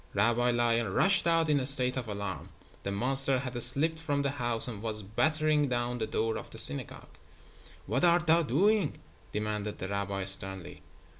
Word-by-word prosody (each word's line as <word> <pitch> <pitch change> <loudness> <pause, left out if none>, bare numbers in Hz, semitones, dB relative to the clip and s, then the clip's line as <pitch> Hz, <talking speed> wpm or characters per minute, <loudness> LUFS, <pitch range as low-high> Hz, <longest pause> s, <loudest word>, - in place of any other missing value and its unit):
Rabbi 120 +4 +1
Lion 120 -3 0
rushed 195 - +3
out 165 -1 +2
in 150 -2 +2
a 130 - -3
state 130 -3 +3
of 125 -3 -5
alarm. 100 -2 -6 0.3
The 100 - -5
monster 135 +6 +3
had 125 -2 -5
slipped 155 +7 +2
from 145 -3 -2
the 140 - -1
house 120 -4 +3
and 110 -4 -7
was 110 -2 -3
battering 155 +7 0
down 120 0 -3
the 110 - -3
door 110 0 -2
of - - -9
the - - -12
synagogue. 120 +2 -4 0.7
"What - - -2
art 175 0 +3
thou 165 +1 +4
doing?" 195 - 0 0.3
demanded 105 0 -4
the 95 - -6
rabbi, 100 -1 -3
sternly. 95 -1 0
120 Hz, 175 wpm, -29 LUFS, 105-145 Hz, 0.7 s, thou